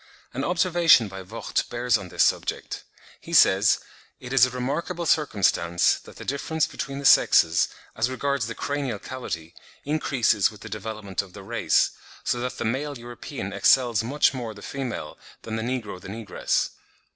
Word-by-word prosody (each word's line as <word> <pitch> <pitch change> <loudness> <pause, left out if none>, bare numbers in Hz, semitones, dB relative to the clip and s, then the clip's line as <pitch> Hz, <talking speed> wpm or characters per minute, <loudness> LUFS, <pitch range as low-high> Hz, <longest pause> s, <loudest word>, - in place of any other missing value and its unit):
(26. - - -21
An 135 - -2
observation 175 - +4
by 95 -1 -8
Vogt 110 +4 -3
bears 120 -1 +1
on 100 -4 -3
this - - +2
subject: - - -1 0.4
he - - -10
says, 95 +2 +6 0.4
"It 125 +1 -7
is 125 -2 +6
a - - -5
remarkable 150 +8 -3
circumstance, 100 - +2
that - - -15
the - - -10
difference 155 +3 0
between 135 -1 -5
the 140 - -6
sexes, 80 -9 +5 0.3
as 115 +3 +1
regards 135 -2 -1
the 115 - -5
cranial 140 -6 -2
cavity, 90 -10 -6 0.3
increases 135 -8 +2
with 105 -2 -14
the - - -8
development 105 -2 -4
of 95 -3 -14
the 100 - -10
race, 115 +4 +2 0.3
so 120 - 0
that 125 +1 -4
the - - -3
male 140 +5 -2
European 120 -3 -7
excels 110 +2 +4
much 140 +6 +2
more 120 -4 -5
the 100 - -12
female, 125 - -5 0.2
than 110 - -4
the 110 - -2
negro 115 -6 -4
the - - -10
negress. 105 -1 -1
120 Hz, 170 wpm, -25 LUFS, 105-135 Hz, 0.4 s, says